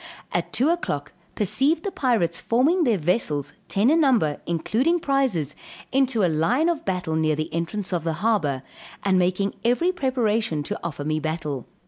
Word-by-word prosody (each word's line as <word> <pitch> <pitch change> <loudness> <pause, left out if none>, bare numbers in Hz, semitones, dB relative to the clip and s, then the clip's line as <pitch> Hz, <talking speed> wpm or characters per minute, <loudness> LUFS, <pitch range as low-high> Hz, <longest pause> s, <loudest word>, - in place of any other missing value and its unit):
At - - -2
2 265 +6 +2
o'clock, 145 - -2 0.2
perceived 275 - +1
the 400 - -2
pirates 230 - 0
forming 305 +9 +2
their 230 -5 +3
vessels, 150 - 0
ten 215 +7 +2
in 325 - +4
number, 225 - +2
including 240 - +1
prizes, 260 - 0 0.4
into 260 -5 +2
a - - +5
line 225 - +2
of 335 -3 -1
battle 180 -4 -1
near 155 -1 +2
the 155 +1 -4
entrance 185 +4 -3
of 170 -3 -1
the 165 -1 -1
harbor, 150 - +1 0.4
and 190 -2 +3
making 185 +2 +1
every 250 +10 +2
preparation 225 - 0
to - - -4
offer 145 -4 -4
me 155 0 0
battle. 155 -4 -3
200 Hz, 165 wpm, -24 LUFS, 160-265 Hz, 0.4 s, a